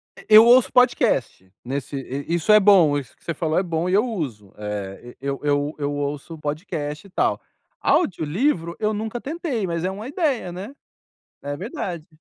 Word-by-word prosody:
E - - -15
eu 220 - +10
ouço 245 +2 +6
podcast. 225 - +2
Nesse 135 +3 -4
i 135 +4 -4
isso 175 +5 +1
é 210 - +8
bom. 185 -8 +5
Isso 135 -5 -7
que - - -31
você 170 - -3
falou 160 0 -1
é - - 0
bom 170 -1 -2
e - - 0
eu 210 +4 +4
uso. 135 - -5
Eh, 105 +2 -6
e - - -9
eu 140 0 -2
eu 145 0 0
eu 145 -1 -2
ouço 145 +3 -4
podcast 150 +1 -4
e - - -19
tal. - - 0 0.4
Audiolivro 170 - +1
eu 215 0 0
nunca 220 +3 -4
tentei, 285 - -3
mas 170 -1 -2
é 185 - 0
uma 205 +4 -7
ideia, 280 - -1
né? 190 +9 -7 0.7
É 145 0 -4
verdade. 175 - -5
170 Hz, 185 wpm, -23 LUFS, 145-215 Hz, 0.7 s, eu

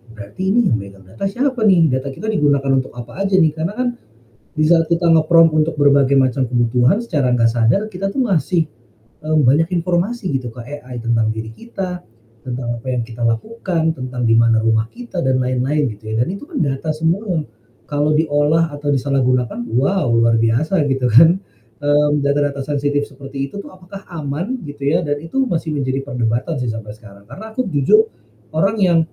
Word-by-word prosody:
"Berarti 110 - -5
ini 235 +4 +3
yang 110 - +1
megang 100 -1 -12
data 145 - -4
siapa 255 +3 -1
nih? 170 -6 +4
Data 130 +2 -2
kita 135 +10 -8
digunakan 140 -7 +1
untuk 130 -2 -1
apa 120 +9 -8
aja 195 - +1
nih?" 160 -5 +4
Karena 165 +5 -3
kan 250 +1 -1 0.7
di 155 - +2
saat 165 -1 +4
kita 170 +1 +1
nge-prompt 165 0 +5
untuk 155 +1 +1
berbagai 140 -1 +4
macam 130 0 +2
kebutuhan, 125 - +2
secara 145 - 0
nggak 115 -1 +3
sadar 115 - +2
kita 195 +1 -3
tuh 260 +5 -1
ngasih, 175 0 +2 0.6
eee, 155 0 0
banyak 145 +5 +3
informasi 180 +5 -1
gitu 125 -2 -5
ke 120 - -10
AI 125 -1 -8
tentang 115 -1 +1
diri 110 0 -6
kita, 185 - -6 0.4
tentang 125 -1 -5
apa 115 - -15
yang 125 -1 0
kita 120 0 -8
lakukan, 160 - -1
tentang 130 -1 -5
di 115 - +4
mana 115 -1 +4
rumah 110 0 +1
kita, 235 -7 -6
dan 130 -1 +2
lain-lain 130 +3 0
gitu 110 +1 -8
ya 110 - 0
dan - - -2
itu 195 +8 -6
kan 320 -4 -5
data 140 +2 -1
semua. 165 +3 -1 0.5
Kalau 150 +1 +1
diolah 155 +1 +2
atau 145 0 -5
disalahgunakan, 130 -3 0
wow 145 +4 +1
luar 115 0 +3
biasa 130 +11 +1
gitu 135 -1 0
kan. 165 - +7 0.4
Mmm, 145 0 +2
data-data 140 0 0
sensitif 145 0 -1
seperti 135 0 -6
itu 200 - -8
tuh 200 - -8
apakah 185 +1 -12
aman 165 - -4
gitu 145 -2 -7
ya 165 +5 +2
dan 145 -2 -2
itu 165 - -2
masih 165 -9 -2
menjadi 135 -1 -1
perdebatan 120 -3 -1
sih 120 - -1
sampai 110 -2 -7
sekarang, 100 -2 -16
karena 170 - -10
aku 255 +2 -2
jujur 195 +7 +3 0.5
orang 195 +7 +1
yang 180 -4 +4
145 Hz, 185 wpm, -18 LUFS, 125-170 Hz, 0.7 s, kan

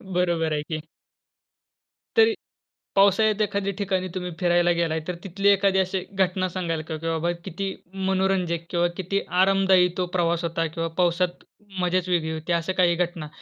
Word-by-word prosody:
बरोबर 170 -3 +1
आहे 150 - 0
की. 155 +1 -4 1.4
तरी 450 0 +6 0.6
पावसाळ्यात 200 +2 +4
एखाद्या 200 -1 -1
ठिकाणी 190 -2 -1
तुम्ही 180 -1 -3
फिरायला 175 -1 +3
गेलाय, 160 -1 0
तर 180 - -1
तिथली 195 +1 0
एखादी 200 -1 +4
अशी 190 0 0
घटना 185 -1 +1
सांगाल 170 -3 -3
का? 160 - -3
की 160 +1 -7
बाबा 165 +1 0
किती 195 +4 -4 0.4
मनोरंजक 185 -3 0
किंवा 175 0 +2
किती 195 +1 -1 0.2
आरामदायी 190 -1 +4
तो 180 - +1
प्रवास 170 -1 +1
होता 165 0 -1
किंवा 165 +1 -3
पावसात 175 0 +1 0.4
मजाच 180 0 0
वेगळी 165 -3 0
होती. 160 +2 -3
अशा 170 +2 0
काही 180 -2 +3
घटना 175 -3 -2
180 Hz, 155 wpm, -24 LUFS, 170-190 Hz, 1.4 s, तरी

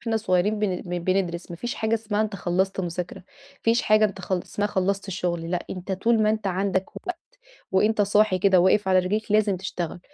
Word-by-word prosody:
وإحنا 230 -2 -1
صغيرين 210 0 +1
بن 205 -3 0
بن 180 0 -3
بندرس. 175 -1 -1
ما 170 - -6
فيش 240 +6 -4
حاجة 220 +1 0
اسمها 215 -2 -1
أنت 215 -2 -3
خلّصت 190 +2 0
مذاكرة، 175 0 -4
ما - - -17 0.4
فيش 230 +1 +3
حاجة 215 0 +4
أنت 195 -2 -2
خلّ 180 -1 -2
اسمها 205 - -2
خلّصت 195 0 -1
الشغل 175 -3 -2
لأ، 180 -1 -2
أنت 185 +1 -5
طول 225 +4 +2
ما 215 - +3
أنت 215 -1 -2
عندك 190 0 0
وقت 360 - -5 0.5
وأنت 210 +3 +3
صاحي 205 -1 +3
كده 185 -1 +4
واقف 190 +2 +3
على 185 0 +5
رجليك، 205 +4 -1
لازم 210 -3 +3
تشتغل. 180 -2 -5
195 Hz, 205 wpm, -25 LUFS, 180-215 Hz, 0.5 s, على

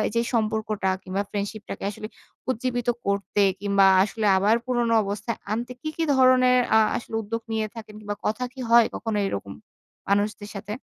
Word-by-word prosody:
যে 230 - +3
সম্পর্কটা 215 -3 0
কিংবা 190 +2 -2
ফ্রেন্ডশিপটাকে 205 +1 -5
আসলে 215 +1 -7 0.4
উজ্জীবিত 245 -1 -2 0.2
করতে 200 +1 0 0.2
কিংবা 200 -1 +3 0.2
আসলে 215 +1 -3
আবার 205 +4 +3
পুরোনো 240 -2 +1
অবস্থায় 205 +4 -4
আনতে 240 +3 -2
কি, 310 - -3
কি 330 - 0
ধরনের 255 -1 +5 0.2
আ - - +8 0.2
আসলে 225 -1 -7
উদ্যোগ 230 +2 -4
নিয়ে 220 -1 -1
থাকেন? 220 -2 -9
কিংবা 205 -1 -5
কথা 235 +4 -1
কি 265 - -13
হয় 235 -1 +7
কখনো 220 -2 -2
এরকম 100 - -5 0.6
মানুষদের 205 +1 0
সাথে? 205 +1 -5
215 Hz, 160 wpm, -25 LUFS, 205-235 Hz, 0.6 s, আ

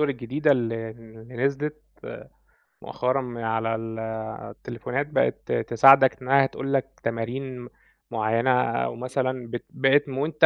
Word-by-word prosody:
الجديدة 140 +1 +1
اللي 115 -3 -2
اللي 115 +1 -14
نزلت 150 +2 -1 1.0
مؤخرًا 130 +2 -1
من 120 -2 -6
على 115 0 0
ال 110 0 -6 0.5
التليفونات، 135 +4 -4
بقت 65 - 0
تساعدك 135 +3 +6
إنّها 135 +2 +4
تقول 135 +1 -4
لك 135 0 -1
تمارين 125 +3 -3
م 120 - -11 0.4
معيّنة، 115 +2 +1 0.3
أو 60 - -3
مثلًا 130 0 -2
بت 120 - -5
بقت 135 +2 +3
م 130 - -5
وأنت 155 +3 +3
130 Hz, 130 wpm, -25 LUFS, 115-135 Hz, 1.0 s, تساعدك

